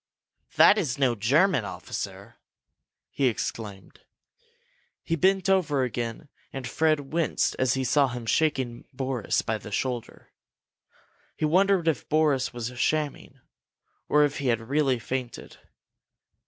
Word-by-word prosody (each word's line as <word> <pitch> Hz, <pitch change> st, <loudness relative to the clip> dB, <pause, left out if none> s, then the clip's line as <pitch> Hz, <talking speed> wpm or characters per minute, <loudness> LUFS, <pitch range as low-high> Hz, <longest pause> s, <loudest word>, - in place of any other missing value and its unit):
"That 210 Hz, -, +7 dB
is 140 Hz, -8 st, -2 dB
no 130 Hz, -3 st, +2 dB
German 135 Hz, -, +2 dB
officer!" -, -, -7 dB, 0.7 s
he 135 Hz, -, +1 dB
exclaimed. 105 Hz, -4 st, -5 dB, 1.0 s
He 165 Hz, -, -1 dB
bent 190 Hz, +2 st, +2 dB
over 160 Hz, -8 st, +2 dB
again 120 Hz, +2 st, -4 dB, 0.2 s
and 135 Hz, -2 st, -5 dB
Fred 155 Hz, -3 st, 0 dB
winced 165 Hz, -3 st, 0 dB
as 130 Hz, -1 st, +2 dB
he 135 Hz, -, -1 dB
saw 135 Hz, +3 st, +3 dB
him 120 Hz, -2 st, -6 dB
shaking 130 Hz, -2 st, 0 dB
Boris 130 Hz, -4 st, -1 dB
by 110 Hz, -1 st, -2 dB
the 105 Hz, -, -10 dB
shoulder. 125 Hz, +2 st, -4 dB, 1.1 s
He -, -, 0 dB
wondered 185 Hz, +2 st, +3 dB
if 155 Hz, -6 st, -1 dB
Boris 150 Hz, -4 st, +2 dB
was 120 Hz, 0 st, -5 dB
shamming, 150 Hz, -2 st, -2 dB, 0.7 s
or 150 Hz, 0 st, +5 dB
if 145 Hz, 0 st, -3 dB
he 140 Hz, -, -2 dB
had 115 Hz, -1 st, -1 dB
really 140 Hz, -3 st, +2 dB
fainted. 125 Hz, +1 st, -6 dB
135 Hz, 125 wpm, -26 LUFS, 120-155 Hz, 1.1 s, That